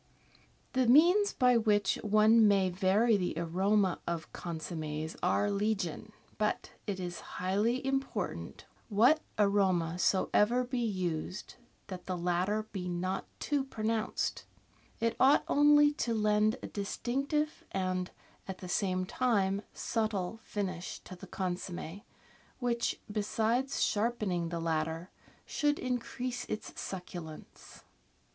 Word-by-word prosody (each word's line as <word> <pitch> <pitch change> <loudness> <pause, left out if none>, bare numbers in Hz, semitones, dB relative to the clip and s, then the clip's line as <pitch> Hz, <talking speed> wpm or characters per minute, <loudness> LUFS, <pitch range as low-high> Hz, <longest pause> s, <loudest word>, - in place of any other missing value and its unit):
The 260 -2 +2
means 350 - +6
by 250 -1 +4
which 210 -3 +2
one 215 +1 +5
may 195 -2 +3
vary 200 +5 +3
the 180 -4 -2
aroma 185 +3 +1
of 170 -1 -4
con 170 -2 -5
sommes 155 -1 -4
are 205 +3 +2
legion, 200 -4 -1 0.3
but 210 0 -1 0.2
it 195 -2 -2
is 175 -1 -4 0.2
highly 210 +8 0
important, 270 0 -3 0.2
what 235 +9 +5 0.2
aroma 190 -5 +2
soever 210 +6 +3
be 250 0 -3
used, 185 -5 -3 0.3
that 185 -2 -8
the 185 -1 -2
latter 180 +5 0
be 180 -3 -4
not 180 +2 -2
too 290 -2 0
pronounced. 225 -3 -2 0.6
It 230 0 0
ought 270 +2 +5
only 295 0 +5
to 235 -5 -1
lend 215 +1 +3
a - - -4
distinctive 275 +9 -2
and, 185 -1 -1 0.4
at 190 -1 -5
the 185 - -8
same 185 -1 0
time, 200 -4 +1
subtle 220 -2 -2
finish 185 -4 -4
to 185 - -10
the 180 - -11
consomm6, 180 0 -4 0.6
which, 235 -2 -1
besides 225 +5 0
sharpening 205 -6 0
the 170 0 -3
latter, 160 +1 -2 0.3
should 295 -1 +1
increase 250 0 -3
its 215 - -5
succulence. 175 -4 -8
205 Hz, 120 wpm, -31 LUFS, 180-235 Hz, 0.6 s, means